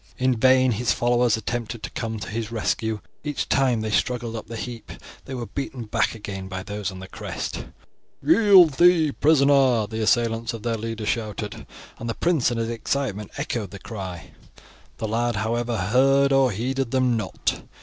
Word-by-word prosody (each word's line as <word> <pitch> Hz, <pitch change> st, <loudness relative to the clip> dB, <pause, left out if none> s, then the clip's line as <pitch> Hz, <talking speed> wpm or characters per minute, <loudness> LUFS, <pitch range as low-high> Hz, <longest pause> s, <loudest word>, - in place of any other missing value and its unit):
In 130 Hz, 0 st, +2 dB
vain 130 Hz, +2 st, +4 dB
his 115 Hz, +2 st, 0 dB
followers 120 Hz, -1 st, +2 dB
attempted 115 Hz, 0 st, -4 dB
to -, -, -5 dB
come 110 Hz, -2 st, -4 dB
to 100 Hz, -4 st, -6 dB
his 110 Hz, 0 st, -4 dB
rescue; 110 Hz, -1 st, -1 dB, 0.2 s
each 150 Hz, -1 st, -2 dB
time 130 Hz, -4 st, +2 dB
they 110 Hz, 0 st, -3 dB
struggled 120 Hz, 0 st, 0 dB
up 110 Hz, -, -6 dB
the 115 Hz, -, -7 dB
heap 115 Hz, 0 st, -7 dB, 0.3 s
they 130 Hz, -, -6 dB
were 120 Hz, -2 st, -4 dB
beaten 135 Hz, -1 st, -5 dB
back 110 Hz, -, 0 dB
again 100 Hz, -3 st, -6 dB
by 95 Hz, -1 st, -5 dB
those 105 Hz, -1 st, -4 dB
on 95 Hz, -, -9 dB
the 95 Hz, 0 st, -9 dB
crest. -, -, -5 dB, 0.6 s
"Yield 195 Hz, -7 st, +7 dB
thee 170 Hz, -4 st, +5 dB
prisoner," 140 Hz, -6 st, +4 dB
the 110 Hz, +1 st, -5 dB
assailants 115 Hz, +1 st, +1 dB
of 110 Hz, -, -9 dB
their 115 Hz, -1 st, 0 dB
leader 115 Hz, 0 st, -4 dB
shouted, 105 Hz, -2 st, -3 dB, 0.3 s
and 115 Hz, -, -5 dB
the 115 Hz, -, -2 dB
prince 170 Hz, -9 st, +2 dB
in 120 Hz, -, -2 dB
his 115 Hz, 0 st, -1 dB
excitement 115 Hz, -3 st, -2 dB
echoed 110 Hz, -6 st, -3 dB
the 100 Hz, -, -9 dB
cry. 95 Hz, -5 st, -7 dB, 0.7 s
The 110 Hz, -, -3 dB
lad, 120 Hz, +2 st, 0 dB
however, 115 Hz, +2 st, -1 dB
heard 135 Hz, +8 st, +3 dB
or 135 Hz, -1 st, +4 dB
heeded 125 Hz, +4 st, -2 dB
them 130 Hz, -1 st, +2 dB
not. 110 Hz, -, -2 dB
115 Hz, 180 wpm, -24 LUFS, 110-130 Hz, 0.7 s, Yield